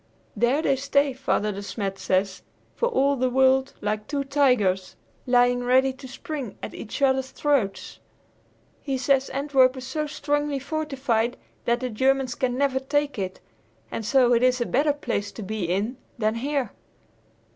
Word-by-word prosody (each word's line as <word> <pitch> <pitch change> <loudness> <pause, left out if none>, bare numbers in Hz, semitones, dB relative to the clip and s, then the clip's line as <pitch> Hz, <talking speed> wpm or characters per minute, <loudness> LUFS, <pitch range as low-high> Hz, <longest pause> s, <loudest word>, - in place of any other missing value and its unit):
There 260 +6 +2
they 275 -1 +2
stay, 280 +1 +1
Father 245 -5 0
De 200 0 -6
Smet 200 -1 -4
says, 190 0 0 0.3
for 480 - 0
all 280 - +2
the 255 -1 +1
world, 265 +1 +3
like 210 +1 -2
two 285 -1 -1
tigers, 250 -10 +2 0.3
lying 245 0 +3
ready 260 +2 +3
to 260 +1 -11
spring 265 -2 -6
at - - -5
each 230 +6 -5
other's 265 -1 +2
throats. 265 -12 -1 0.8
He 270 -2 -2
says 270 +1 +2
Antwerp 270 -2 +3
is 255 - -7
so 300 +4 -2
strongly 290 -1 -1
fortified 265 -5 -1 0.3
that 235 +1 +1
the 255 - -2
Germans 265 +2 +1
can 255 -2 -1
never 270 -1 +1
take 290 -1 -1
it, 185 -1 -4 0.5
and 225 - -4
so 245 +2 +4
it 235 - +3
is 255 0 +3
a 240 - 0
better 290 +5 +2
place 230 -8 -3
to 220 - -7
be 210 -1 -3
in 200 +8 -1 0.2
than 215 -2 +1
here. 265 0 -2
260 Hz, 165 wpm, -25 LUFS, 230-275 Hz, 0.8 s, so